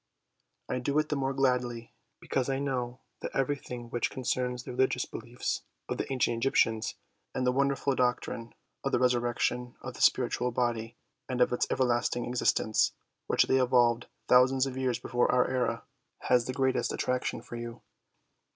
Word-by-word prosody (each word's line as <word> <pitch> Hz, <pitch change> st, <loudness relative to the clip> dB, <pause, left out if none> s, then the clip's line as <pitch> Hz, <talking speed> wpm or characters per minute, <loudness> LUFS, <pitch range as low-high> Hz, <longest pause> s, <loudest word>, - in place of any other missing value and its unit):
I 125 Hz, -, -1 dB
do 140 Hz, +4 st, -1 dB
it 155 Hz, 0 st, +2 dB
the 150 Hz, -, 0 dB
more 135 Hz, -1 st, 0 dB
gladly 125 Hz, -3 st, 0 dB, 0.3 s
because 130 Hz, 0 st, -1 dB
I 135 Hz, -, +1 dB
know 130 Hz, -2 st, -2 dB, 0.2 s
that -, -, -4 dB
everything 125 Hz, -3 st, -2 dB
which 120 Hz, -, 0 dB
concerns 125 Hz, -1 st, -2 dB
the -, -, -7 dB
religious 125 Hz, 0 st, +1 dB
beliefs 120 Hz, +2 st, -4 dB, 0.3 s
of -, -, -3 dB
the -, -, -3 dB
ancient 125 Hz, -3 st, +1 dB
Egyptians 115 Hz, -3 st, +1 dB, 0.4 s
and 130 Hz, -, 0 dB
the 125 Hz, -, +4 dB
wonderful 140 Hz, +1 st, +1 dB
doctrine 125 Hz, -2 st, -1 dB, 0.3 s
of -, -, -1 dB
the -, -, +5 dB
resurrection 125 Hz, 0 st, +1 dB
of 130 Hz, -, -7 dB
the -, -, -9 dB
spiritual 125 Hz, 0 st, +3 dB
body 120 Hz, -1 st, -1 dB, 0.3 s
and 125 Hz, -1 st, -2 dB
of 125 Hz, -, +4 dB
its 125 Hz, -, +1 dB
everlasting 120 Hz, -1 st, +1 dB
existence, 120 Hz, -3 st, +2 dB, 0.3 s
which -, -, +4 dB
they 130 Hz, 0 st, +3 dB
evolved 120 Hz, -2 st, +3 dB, 0.2 s
thousands 130 Hz, +1 st, +5 dB
of 135 Hz, -1 st, -4 dB
years 130 Hz, -2 st, 0 dB
before 125 Hz, -1 st, +1 dB
our 125 Hz, 0 st, +3 dB
era, 130 Hz, -2 st, -1 dB, 0.4 s
has 125 Hz, -2 st, +3 dB
the -, -, -2 dB
greatest 130 Hz, 0 st, +1 dB
attraction 125 Hz, -2 st, -1 dB
for 120 Hz, -, -8 dB
you. 120 Hz, 0 st, -7 dB
125 Hz, 165 wpm, -30 LUFS, 120-130 Hz, 0.4 s, the